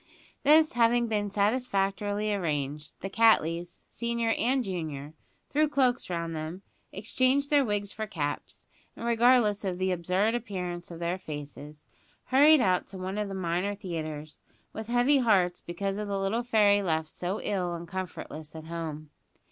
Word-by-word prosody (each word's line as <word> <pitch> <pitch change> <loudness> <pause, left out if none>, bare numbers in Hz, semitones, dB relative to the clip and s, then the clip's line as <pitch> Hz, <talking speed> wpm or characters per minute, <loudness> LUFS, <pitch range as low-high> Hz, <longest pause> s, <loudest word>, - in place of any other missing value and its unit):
This 310 +2 +5
having 235 0 +3
been 210 -2 -1
satisfactorily 205 -1 0
arranged, 150 -5 -3
the - - -3
Cattleys, 175 -6 +2
senior 235 -1 -1
and 255 +3 +1
junior, 155 -7 -5 0.4
threw 305 +1 +3
cloaks 260 -7 +1
round 170 -2 -3
them, 160 +5 -6 0.3
exchanged 255 +7 +1
their 290 -1 +5
wigs 205 -3 -1
for 220 0 -5
caps; 145 -6 -4 0.3
and, 230 - -7
regardless 235 -3 +4
of 185 -2 -2
the 185 0 0
absurd 180 +5 +1
appearance 180 -7 -4
of 170 - -8
their 170 +2 -2
faces, 150 -1 -8 0.4
hurried 290 +3 +6
out 185 -3 +2
to 195 - -8
one 190 +2 -4
of 210 - -1
the 195 - -5
minor 185 +2 -1
theatres, 155 -6 -6 0.3
with 220 0 -6
heavy 245 +4 +3
hearts 190 -7 +2
because 195 +3 -3
of 210 - -3
the 200 -1 -2
little 195 +5 0
fairy 210 -4 +4
left 160 -4 -1
so 180 +6 -3
ill 180 -4 -2
and 170 0 -7
comfortless 165 -4 -6
at 160 - -7
home. 160 -2 -6
195 Hz, 155 wpm, -28 LUFS, 170-230 Hz, 0.4 s, hurried